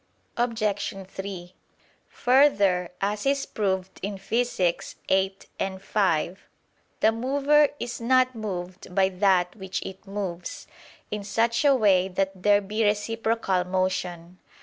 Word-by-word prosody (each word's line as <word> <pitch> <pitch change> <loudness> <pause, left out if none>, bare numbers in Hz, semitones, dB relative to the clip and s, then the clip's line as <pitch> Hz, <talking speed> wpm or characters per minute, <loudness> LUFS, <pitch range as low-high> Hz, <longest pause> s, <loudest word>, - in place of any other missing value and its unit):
Obj. 215 -5 -1
3: 190 -2 -7 0.6
Further, 205 -10 +3
as 205 +5 -1
is 275 0 +1
proved 190 -3 -2
in 200 +1 -4
Phys. 195 -5 -1 0.5
viii, 190 -1 -4
5, 190 -2 0 0.6
the 220 - +5
mover 280 +5 +3
is 240 0 -5
not 255 +2 +3
moved 185 -5 -6
by 190 -1 +4
that 185 -2 +2
which 190 -2 -4
it 190 +1 -9
moves, 190 -3 -5 0.5
in 210 -1 -3
such 230 +4 +1
a 280 -2 +5
way 195 -6 +4
that 190 +1 -1
there 205 +1 +4
be 210 +3 -1
reciprocal 215 -2 0
motion. 180 -1 -2
200 Hz, 120 wpm, -26 LUFS, 185-225 Hz, 0.6 s, the